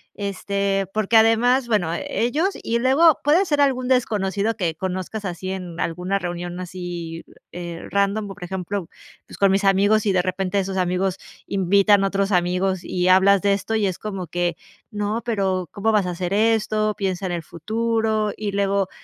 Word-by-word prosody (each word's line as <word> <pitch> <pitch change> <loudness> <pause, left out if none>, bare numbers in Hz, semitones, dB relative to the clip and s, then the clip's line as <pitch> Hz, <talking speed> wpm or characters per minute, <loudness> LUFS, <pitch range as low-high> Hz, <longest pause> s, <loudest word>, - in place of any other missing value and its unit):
Este, 200 0 -1
porque 215 +1 0
además 235 +3 +4
bueno, 185 -7 +1
ellos 285 - 0
y 235 +1 -1
luego 275 +5 +4
puede 315 +7 +4
ser 295 -4 +1
algún 255 -3 +1
desconocido 215 -4 0
que 170 -5 -1
conozcas 185 +4 -4
así 185 -1 -5
en 180 -3 -6
alguna 180 +4 -1
reunión 175 0 -5
así, 175 -2 -6 0.3
eh, 170 -1 -6
random, 200 +1 0
por 195 -2 -9
ejemplo, 190 0 -4 0.4
pues, - - -12
con 200 - +4
mis 195 +1 +1
amigos, 200 +2 +4
si 205 - +1
de 185 -1 +3
repente, 190 +2 -1
esos 195 0 -3
amigos 185 +1 0 0.3
invitan 200 +1 +3
a - - +3
otros 195 +1 0
amigos 180 +1 +1
y 180 0 -1
hablas 190 +1 +5
de 200 -1 +3
esto, 205 +3 -2
y 210 -3 +2
es 185 - -3
como 195 -4 -5
que: 175 +1 -1 0.3
"No, 210 +2 -2
pero, 195 -6 -1
¿cómo 220 +2 0
vas 210 -3 +3
a 180 - -2
hacer 180 +1 -3
esto? 215 0 +1
Piensa 190 -1 -2
en 180 - -3
el 170 -1 -3
futuro". 220 +4 -1
Y 210 -1 -3
luego 200 -1 0
195 Hz, 175 wpm, -22 LUFS, 180-215 Hz, 0.4 s, hablas